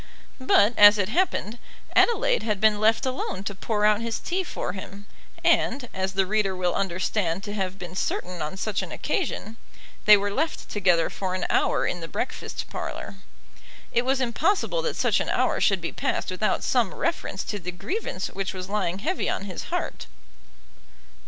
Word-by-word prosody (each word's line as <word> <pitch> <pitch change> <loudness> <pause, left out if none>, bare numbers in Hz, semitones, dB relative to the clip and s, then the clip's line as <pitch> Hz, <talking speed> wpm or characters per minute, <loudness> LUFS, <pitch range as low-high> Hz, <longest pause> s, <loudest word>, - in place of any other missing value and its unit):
But, 240 -4 +4
as 205 0 +10
it 200 -1 0
happened, 240 - 0 0.4
Adelaide - - +4
had 210 -3 -1
been 215 0 +4
left 220 +3 +3
alone 255 -7 -3
to 200 - -3
pour 210 +2 -1
out 210 +1 +4
his 230 -1 -2
tea 370 +2 -2
for 180 - -4
him, 200 +1 -9 0.4
and, 250 0 +2
as 190 0 -2
the 195 0 +2
reader 200 -1 +1
will 180 -1 0
understand 185 -1 -1
to 205 - -5
have 190 -2 -3
been 180 -2 -8
certain 180 -2 -2
on 155 +5 -4
such 210 +1 -1
an - - -7
occasion, 230 - -3 0.5
they 210 0 +9
were 200 0 -2
left 310 +10 -2
together 180 -5 +2
for 185 -1 -3
an 185 - -2
hour - - +2
in 180 - -1
the 165 - -6
breakfast 245 - -4
parlour. 195 - -5 0.7
It 235 - +3
was 265 +1 +1
impossible 345 - +1
that 485 -1 -2
such - - +2
an - - -2
hour - - +1
should - - +3
be - - -3
passed - - -2
without - - 0
some - - +1
reference - - -2
to 205 - -4
the 180 -1 -5
grievance 185 - -4
which 195 0 -3
was 185 0 -6
lying 190 -4 -1
heavy 345 - -1
on - - -2
his 185 -3 -6
heart. - - -4
205 Hz, 180 wpm, -25 LUFS, 190-235 Hz, 0.7 s, as